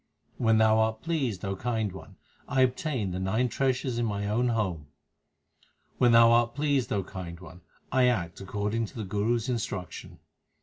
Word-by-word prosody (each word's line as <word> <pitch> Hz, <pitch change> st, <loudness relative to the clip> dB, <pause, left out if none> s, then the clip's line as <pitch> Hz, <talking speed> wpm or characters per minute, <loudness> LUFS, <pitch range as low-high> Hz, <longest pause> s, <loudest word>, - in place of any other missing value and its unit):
When 115 Hz, -2 st, +3 dB
Thou 110 Hz, 0 st, +4 dB
art 110 Hz, 0 st, 0 dB
pleased, 135 Hz, -, -2 dB
O 95 Hz, 0 st, -2 dB
Kind 110 Hz, -1 st, -2 dB
One, 95 Hz, -, -11 dB, 0.3 s
I 135 Hz, -2 st, +1 dB
obtain 130 Hz, -, 0 dB
the 90 Hz, -, -3 dB
nine 110 Hz, +7 st, 0 dB
treasures 130 Hz, -1 st, -1 dB
in 120 Hz, -, +1 dB
my 100 Hz, -1 st, -2 dB
own 115 Hz, +4 st, +1 dB
home. 95 Hz, -11 st, -1 dB, 1.1 s
When 120 Hz, -1 st, +5 dB
Thou 115 Hz, 0 st, +7 dB
art 120 Hz, 0 st, +3 dB
pleased, 145 Hz, -3 st, 0 dB
O 100 Hz, -2 st, 0 dB
Kind 85 Hz, -2 st, -8 dB
One, 90 Hz, -1 st, -13 dB, 0.3 s
I 130 Hz, -1 st, +4 dB
act 90 Hz, -9 st, -1 dB
according 105 Hz, +3 st, -2 dB
to -, -, -16 dB
the 110 Hz, -, -4 dB
Guru 105 Hz, +5 st, 0 dB
s 115 Hz, +1 st, -3 dB
instruction. 110 Hz, -7 st, -4 dB
110 Hz, 175 wpm, -28 LUFS, 100-125 Hz, 1.1 s, Thou